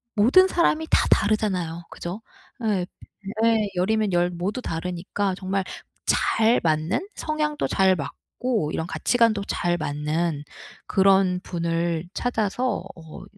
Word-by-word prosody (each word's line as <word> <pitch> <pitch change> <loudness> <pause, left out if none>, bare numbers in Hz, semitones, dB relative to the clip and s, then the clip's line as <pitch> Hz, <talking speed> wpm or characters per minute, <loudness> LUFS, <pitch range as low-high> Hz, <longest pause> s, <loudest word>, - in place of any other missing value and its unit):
모든 255 - +6
사람이 320 -3 +1
다 - - +3
다르잖아요 185 -6 +1
그죠? 180 +6 -6 0.4
예. 195 -5 +1 0.6
예. 225 -2 +3
10 180 +3 0
이면 215 -3 +1
10 175 0 +3
모두 180 +7 -3
다르니까 180 +2 -2
정말 190 +1 -2 0.4
잘 225 +2 +3
맞는 160 - 0
성향도 305 -1 -1
잘 190 -1 +3
맞고 185 - -3
이런 160 - -2
가치관도 230 -1 +2
잘 175 -3 0
맞는 150 0 -2 0.4
그런 190 -1 +4
분을 170 -1 -2
찾아서 245 +1 -1
어 160 0 -11
190 Hz, 230 characters per minute, -24 LUFS, 170-220 Hz, 0.6 s, 모든